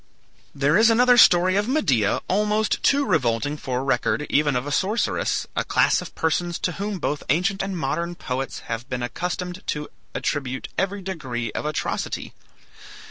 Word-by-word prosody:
There 145 +6 +3
is 225 +1 +6
another 245 +2 +5
story 185 -5 +6
of 205 +1 +1
Medea 140 - +2
almost 210 +2 +1
too 280 0 +3
revolting 145 - +1
for 130 -3 -3
record 140 +2 0
even 145 -2 +2
of 125 +2 -1
a 145 - -4
sorceress, 200 +9 0
a - - +1
class - - +2
of - - -10
persons 170 +1 0
to 180 - -1
whom 200 +2 -4
both 150 -3 -2
ancient 180 +7 +1
and 195 -1 -3
modern 170 +4 -2
poets 135 -3 -4
have 115 +3 -5
been 125 -1 -3
accustomed 180 +6 -4
to 150 0 -3 0.3
attribute 130 -3 -2
every 195 +1 -1
degree 130 - -4
of - - -3
atrocity. 150 - -3
165 Hz, 160 wpm, -23 LUFS, 135-195 Hz, 0.3 s, is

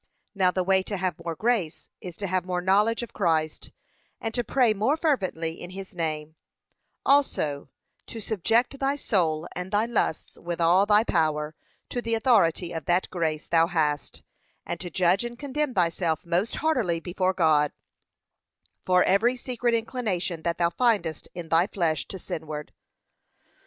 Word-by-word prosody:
Now 190 -3 +3
the 185 0 0
way 190 +1 +3
to 200 +1 -4
have 180 -3 -2
more 165 -1 -3
grace 215 -6 -1
is 175 -2 -8
to 205 - -4
have 185 -1 0
more 180 -1 -2
knowledge 205 +6 +2
of 235 - -9
Christ, 160 -5 0 0.5
and 225 0 -4
to 245 - -1
pray 240 -1 +3
more 220 +9 +1
fervently 185 - -1
in 175 - -7
his 190 +1 -9
name; 155 -2 -3 0.7
also, 155 - +2 0.4
to 230 - -7
subject 225 +6 0
thy 275 +1 +1
soul 170 - 0
and 180 +1 -4
thy 210 +2 +2
lusts, 230 -8 -2
with 170 0 -4
all 175 +4 +4
thy 210 +1 +5
power, 155 -5 0 0.4
to 245 - -3
the 230 -1 0
authority 190 -8 +3
of 160 -3 -5
that 175 +1 +1
grace 160 -3 -1
thou 165 -1 +3
hast, 150 -4 -1 0.4
and 170 - -4
to 180 - -6
judge 180 +4 +2
and 240 0 -6
condemn 285 -1 -2
thyself 170 -2 0
most 175 +6 0
heartily 245 - +1
before 185 +2 -1
God, 155 -4 +3 1.1
for 180 0 +4
every 225 +6 +3
secret 245 -1 -1
inclination 215 -8 -2
that 170 +1 -1
thou 170 -1 +2
findest 200 -9 0
in 170 -2 -7
thy 165 +3 +4
flesh 170 -6 -1
to 190 - -6
sinward. 155 -4 -6
185 Hz, 160 wpm, -26 LUFS, 165-225 Hz, 1.1 s, thy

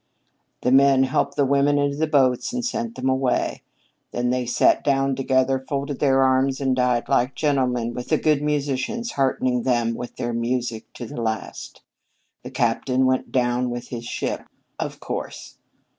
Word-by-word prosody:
The 125 - +2
men 135 0 +5
helped 135 +3 0
the 145 - +2
women 140 +1 +3
into 145 0 +1
the 160 +1 +1
boats 130 - +2
and 250 -1 -2
sent 235 -1 -3
them 130 - -3
away. 130 -1 0 0.5
Then 120 0 -1
they 125 -1 -1
sat 120 - +3
down 135 -1 +1
together, 130 0 +1
folded 140 +1 -4
their 135 -2 +3
arms, 130 +1 +2
and 135 -2 +1
died 125 -2 +1
like 125 +2 +1
gentlemen, 125 -5 0
with 125 0 -6
the 155 - +3
good 150 -2 +2
musicians 150 - -1
heartening 130 -2 0
them 120 -2 +1
with 120 +1 -7
their 120 0 -3
music 115 -1 -2
to 120 - -7
the 115 - -6
last. 110 -1 -5 0.6
The - - -8
captain 125 +2 +1
went 130 0 0
down 125 0 +1
with 120 0 -6
his 120 -1 -6
ship, - - -4 0.3
of - - -4
course. - - -6
130 Hz, 170 wpm, -23 LUFS, 125-140 Hz, 0.6 s, men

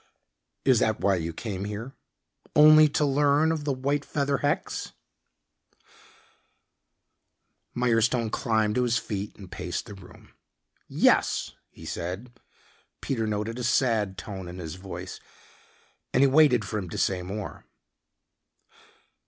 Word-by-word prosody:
"Is 130 -4 +5
that 110 -1 +1
why 100 - +2
you 85 -1 -3
came 95 +2 -5
here? 105 +6 -6 0.6
Only 155 0 +8
to 150 +1 +1
learn 145 +2 +3
of 155 -2 -3
the 145 - +1
white 140 +2 -1
feather 140 -1 -1
hex?" 145 - -2 2.8
Mirestone 115 -1 +1
climbed 110 -2 +1
to 125 - +1
his 120 -1 +2
feet 105 -2 -5
and 95 -3 -12
paced 90 -2 -4
the 110 - -10
room. 95 -2 -15 0.5
"Yes," - - +2 0.2
he - - -14
said. 95 +8 -5 0.7
Peter 115 -5 -2
noted 105 +3 -3
a - - -3
sad 115 -5 +1
tone 95 -2 -7
in 90 +1 -8
his 80 -4 -6
voice, 95 +1 -8 1.0
and 130 - +5
he - - +6
waited 135 -6 +4
for 105 +3 -3
him 95 -3 -6
to - - -6
say 95 -2 0
more. 100 +3 -7
115 Hz, 130 wpm, -26 LUFS, 100-135 Hz, 2.8 s, Only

